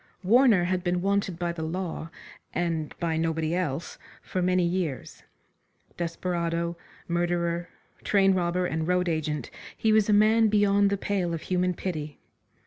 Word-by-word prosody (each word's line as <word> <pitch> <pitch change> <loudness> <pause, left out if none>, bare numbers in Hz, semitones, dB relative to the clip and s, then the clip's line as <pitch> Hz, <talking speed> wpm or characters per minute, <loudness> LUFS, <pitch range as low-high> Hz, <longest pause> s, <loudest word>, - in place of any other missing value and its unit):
Warner 225 -2 +5
had 180 0 -1
been 175 0 0
wanted 200 -3 0
by 175 -1 -1
the 170 -1 -6
law, 165 0 -4 0.5
and 165 -3 -1
by 165 -2 0
nobody 160 0 0
else, 165 -4 -3 0.2
for 185 - -3
many 180 0 +2
years. 170 -7 -3 0.7
Desperado, 170 0 -2 0.3
murderer, 170 0 -1 0.3
train 195 -2 +4
robber 180 0 0
and 160 -2 -2
road 180 0 +1
agent, 155 -2 -2 0.3
he 220 -1 +2
was 215 -1 +3
a - - +5
man 215 +2 +5
beyond 205 -1 +3
the 200 - 0
pale 185 -4 -1
of 160 - -6
human 180 0 0
pity. 155 -6 -4
175 Hz, 145 wpm, -27 LUFS, 165-190 Hz, 0.7 s, Warner